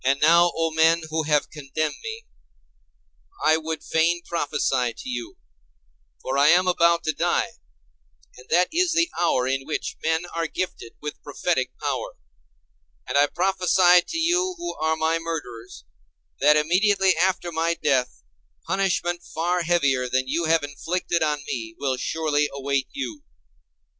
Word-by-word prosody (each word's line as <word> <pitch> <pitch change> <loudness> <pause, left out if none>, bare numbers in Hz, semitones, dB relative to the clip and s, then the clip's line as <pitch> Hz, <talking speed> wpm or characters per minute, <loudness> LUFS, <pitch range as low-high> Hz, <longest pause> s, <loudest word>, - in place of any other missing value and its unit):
And 135 +2 +2
now, 170 +3 +5
O 165 0 0
men 160 +1 +3
who 160 0 -1
have 150 -1 +2
condemned 150 +1 -3
me, 445 +1 -7 1.2
I 155 - +5
would 160 0 -5
fain 170 +2 +1
prophesy 135 -7 -1
to - - -10
you; 120 -2 -5 0.9
for 135 +1 -1
I 145 - +5
am 180 +3 +5
about 170 -1 +3
to 155 - 0
die, - - 0 0.8
and 125 +1 -16
that 180 +2 +3
is 350 0 +2
the 335 0 +2
hour 130 -7 +2
in 135 +1 -1
which 155 - -4
men 160 +2 0
are 165 0 -1
gifted 155 -8 -5
with 150 - -6
prophetic - - -2
power. - - -3 0.9
And 125 - -3
I 145 +1 +5
prophesy 180 0 +4
to 330 - -6
you 360 +3 +1
who 345 0 -4
are 160 0 0
my 160 +1 0
murderers, 125 - -7 0.6
that 150 +1 +5
immediately 190 +4 +3
after 175 0 0
my 165 +1 0
death 135 -6 0 0.4
punishment 175 -3 0
far 175 +2 -1
heavier 140 -7 +1
than 130 +1 0
you 165 +5 -1
have 160 -1 +2
inflicted 170 +4 -2
on 150 -2 0
me 115 -3 -5
will 135 -2 -1
surely 150 +2 0
await 140 -1 -2
you. 290 +2 -5
160 Hz, 150 wpm, -24 LUFS, 140-175 Hz, 1.2 s, now